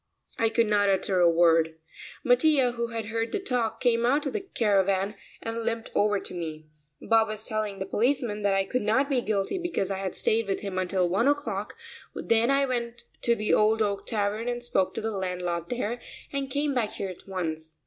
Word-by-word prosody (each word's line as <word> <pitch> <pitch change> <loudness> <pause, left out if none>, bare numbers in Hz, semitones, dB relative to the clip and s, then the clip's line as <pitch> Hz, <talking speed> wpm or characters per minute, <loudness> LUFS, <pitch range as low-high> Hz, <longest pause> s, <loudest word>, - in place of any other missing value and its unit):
I 225 - +3
could 230 +1 +2
not 205 -1 +3
utter 190 -1 +1
a 175 -1 +6
word. 165 -1 +4 0.5
Mattia, 255 0 +4
who 235 -1 -2
had 230 -1 -4
heard 225 +2 -2
the - - -1
talk, 245 - -1
came 235 -2 +2
out 275 +5 +2
of - - -2
the 430 - 0
caravan 200 - +1 0.3
and 225 0 -3
limped 230 0 -3
over 205 -1 +2
to - - -8
me. 160 -3 -5 0.3
Bob 225 -1 +3
was 215 0 -5
telling 215 -2 -2
the 190 - -4
policeman 235 0 0
that 200 -1 +2
I 195 0 +2
could 250 +6 -1
not 260 +7 +1
be 255 -2 +2
guilty 210 - -1
because 345 - -2
I 190 - -2
had 190 -2 -3
stayed 225 -1 +2
with 195 - -1
him 195 -2 -3
until 185 -1 +1
one 195 +8 +1
o'clock, 290 0 -1 0.4
then 230 +2 +2
I 275 0 +3
went 235 -2 -3 0.2
to 235 - +3
the 215 -1 0
Old 220 +1 +4
Oak 200 -1 -2
Tavern 215 +1 0
and 240 0 -2
spoke 190 -6 0
to - - -2
the 220 +1 -2
landlord 180 -3 -3
there, 240 -1 -2 0.3
and 275 -1 -2
came 285 +2 0
back 235 -5 -1
here 195 - -4
at 185 - -11
once. 160 -4 -4
215 Hz, 210 wpm, -27 LUFS, 195-240 Hz, 0.5 s, a